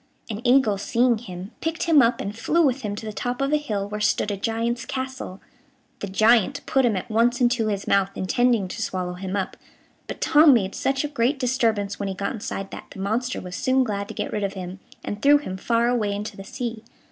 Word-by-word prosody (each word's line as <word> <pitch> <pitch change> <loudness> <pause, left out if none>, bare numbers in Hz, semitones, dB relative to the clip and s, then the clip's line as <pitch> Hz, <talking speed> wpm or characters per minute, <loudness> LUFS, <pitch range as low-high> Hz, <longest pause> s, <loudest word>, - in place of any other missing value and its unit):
An 210 +1 -5
eagle 245 -5 +4
seeing 235 +2 +2
him, 185 -3 -8
picked 325 0 -2
him 320 -4 +6
up 235 0 +2
and 200 +1 -4
flew 330 +9 +2
with 265 -1 +1
him 205 -3 -3
to 220 - -7
the 215 - -5
top 245 +3 -3
of 275 +2 0
a - - +5
hill 210 -9 -3
where 210 +1 -5
stood 210 0 +1
a - - -1
giant's 230 +4 -1
castle. 260 -7 -5 0.6
The 200 - -4
giant 215 +2 +3
put 270 -1 +2
him 225 -4 +2
at 190 - -3
once 235 +3 +2
into 240 -3 +2
his 200 -2 -2
mouth, 195 -1 +3
intending 230 +2 +1
to - - -5
swallow 180 -1 -2
him 190 +2 -5
up, 195 -2 -3 0.5
but - - -6
Tom 300 -3 +6
made 195 -4 0
such 270 +1 0
a - - -1
great 280 0 0
disturbance 230 -6 0
when 200 - -2
he 190 - -4
got 200 +5 -2
inside 195 -3 -5
that - - -8
the - - -12
monster 230 +6 -1
was 180 -1 -7
soon 260 0 +2
glad 200 -4 -3
to - - -8
get - - -3
rid 210 - -1
of 195 0 -1
him, 185 0 -7 0.3
and 205 0 -4
threw 290 +3 +6
him 260 -10 -5
far 230 +5 +1
away 225 -4 +1
into 210 +1 -5
the 195 - -9
sea. 230 +1 -5
225 Hz, 230 wpm, -24 LUFS, 200-250 Hz, 0.6 s, him